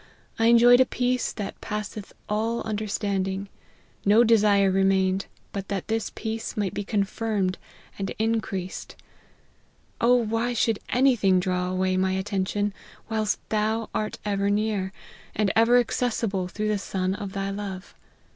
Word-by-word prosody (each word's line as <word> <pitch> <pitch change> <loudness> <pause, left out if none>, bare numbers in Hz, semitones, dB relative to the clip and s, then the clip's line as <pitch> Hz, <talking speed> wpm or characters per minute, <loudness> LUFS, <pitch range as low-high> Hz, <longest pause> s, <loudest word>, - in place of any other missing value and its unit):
I 225 - +4
enjoyed 240 +1 +7
a 260 - +6
peace 250 0 0
that 205 -2 -6
passeth 210 -1 -5 0.2
all 225 +3 -1
understanding; 200 -2 -2 0.5
no 210 +4 +6
desire 205 -4 +4
remained, 190 0 +2 0.3
but 195 -1 -4
that 200 0 -4
this 225 0 -1
peace 225 0 -4
might 205 -3 -1
be 205 +1 -3
confirmed 200 -2 -1 0.4
and 195 - -2
increased. 215 -4 -2 1.1
O 245 +2 +5
why 230 +1 0
should 225 -2 +1
any 260 +1 +4
thing 190 -4 +3
draw 180 0 -1
away 185 0 0
my 190 0 +1
attention, 195 +1 -1 0.4
whilst 215 -2 -1
Thou 220 +1 0
art 215 - -2
ever 200 -1 0
near, 205 -2 0 0.4
and 205 -2 +1
ever 230 +2 +5
accessible 225 -6 0
through 215 +3 -3
the 210 -1 +1
Son 190 -1 -2
of 200 -1 -6
Thy 195 -1 -2
love 195 -2 -6
205 Hz, 140 wpm, -25 LUFS, 195-225 Hz, 1.1 s, enjoyed